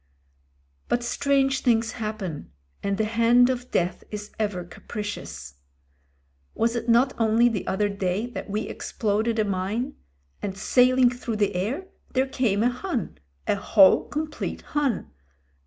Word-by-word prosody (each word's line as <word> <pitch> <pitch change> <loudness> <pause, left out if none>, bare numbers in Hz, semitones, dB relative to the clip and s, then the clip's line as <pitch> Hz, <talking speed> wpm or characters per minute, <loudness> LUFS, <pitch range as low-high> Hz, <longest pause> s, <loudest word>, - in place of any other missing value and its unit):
But 240 - 0
strange 270 +2 +2
things 230 -3 +2
happen, 215 -9 -5 0.3
and 200 0 -1
the 220 - +1
hand 230 +3 +4
of 250 0 -5
Death 175 0 0
is 210 0 -6
ever 205 -5 -1
capricious. 130 - -7 1.0
Was 230 +1 +1
it 235 0 -3
not 245 +3 +4
only 225 +1 +4
the 210 -5 -3
other 205 +2 +1
day 200 +1 -1
that 200 -2 -6
we 210 +2 -1
exploded 220 +1 -1
a 215 - +2
mine, 205 +8 -2 0.5
and 195 -1 -4
sailing 250 +4 +4
through 245 -2 -4
the 205 -1 +1
air 235 - -2 0.3
there 260 +1 +3
came 235 -6 +1
a 245 - +4
Hun 255 0 -4
— 70 0 -39
^a - - +2
whole 195 -1 +5
complete 310 +1 -4
Him. 285 -7 +1
220 Hz, 145 wpm, -25 LUFS, 200-245 Hz, 1.0 s, whole